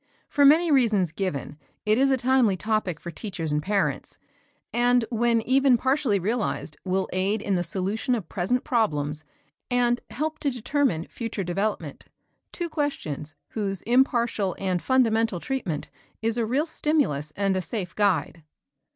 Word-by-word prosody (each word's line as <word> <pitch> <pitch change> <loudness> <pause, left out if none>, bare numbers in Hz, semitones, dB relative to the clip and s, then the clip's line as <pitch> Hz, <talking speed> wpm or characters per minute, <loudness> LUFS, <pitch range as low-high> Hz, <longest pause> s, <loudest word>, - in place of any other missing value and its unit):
For 285 - +3
many 320 +4 +6
reasons 215 - +3
given, 160 -5 -4 0.3
it 215 +3 +3
is 275 +1 +4
a 265 - +3
timely 245 -6 +3
topic 210 -6 -1
for 170 - -7
teachers 165 -4 -4
and 150 0 +1
parents, 180 -5 -1 0.6
and 245 0 +3
when 230 0 +2
even 265 0 +4
partially 260 -3 +1
realized 205 -5 -2
will 190 0 0
aid 195 +4 +1
in 205 -1 -2
the 180 - +2
solution 195 +8 -1
of 205 -8 -5
present 195 +10 -1
problems 150 - 0 0.5
and 245 -1 +2
help 310 +3 -3
to 285 - 0
determine 250 - 0
future 225 -4 -4
development, 195 +5 -3 0.5
two 345 - -3
questions, 275 - -3
whose 195 -4 -3
impartial 235 -6 +2
and 185 -3 -1
fundamental 225 -6 +2
treatment 185 - -3 0.3
is 225 0 +1
a 235 -2 0
real 270 +7 +1
stimulus 280 - 0
and 195 -1 +1
a 185 - 0
safe 180 -1 -5
guide. 180 -5 +1
215 Hz, 150 wpm, -25 LUFS, 185-250 Hz, 0.6 s, many